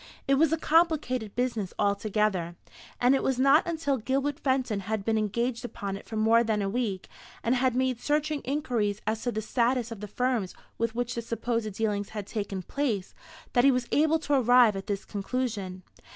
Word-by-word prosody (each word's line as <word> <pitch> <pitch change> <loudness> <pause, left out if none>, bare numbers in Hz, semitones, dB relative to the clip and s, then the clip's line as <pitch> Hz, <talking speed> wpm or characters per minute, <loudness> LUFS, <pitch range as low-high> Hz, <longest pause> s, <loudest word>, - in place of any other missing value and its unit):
It 275 - +4
was 305 +3 +4
a 325 - +2
complicated 300 - +1
business 235 -6 -2
altogether; 200 -4 0 0.4
and 245 +2 +4
it 270 - +2
was 265 -2 0
not 275 +6 +5
until 315 -5 0
Gilbert 275 +5 -1
Fenton 260 -7 0
had 200 +1 -3
been 225 - +1
engaged 235 +4 -1
upon 200 -5 -5
it 195 - -10
for 225 - -6
more 225 +2 +4
than 220 -2 0
a - - -1
week, 210 -4 -2 0.4
and 235 - +2
had 255 -1 +1
made 255 -2 0
searching 300 0 0
inquiries 240 -8 -1
as 220 +1 -1
to 245 - -1
the 220 -1 -3
status 240 +1 0
of 225 - -6
the 210 - -6
firms 240 -3 -1 0.2
with 230 0 -1
which 245 0 -1
the 235 - -3
supposed 230 -1 -2
dealings 205 -1 -1
had 205 - -3
taken 200 -3 -4
place, 225 -6 -2 0.4
that 245 - +4
he 275 - +7
was 250 -2 +1
able 315 +2 +3
to 300 -2 -2
arrive 245 -4 +5
at 195 +1 -6
this 200 -2 -3
conclusion. 200 -4 -3
235 Hz, 195 wpm, -28 LUFS, 210-260 Hz, 0.4 s, he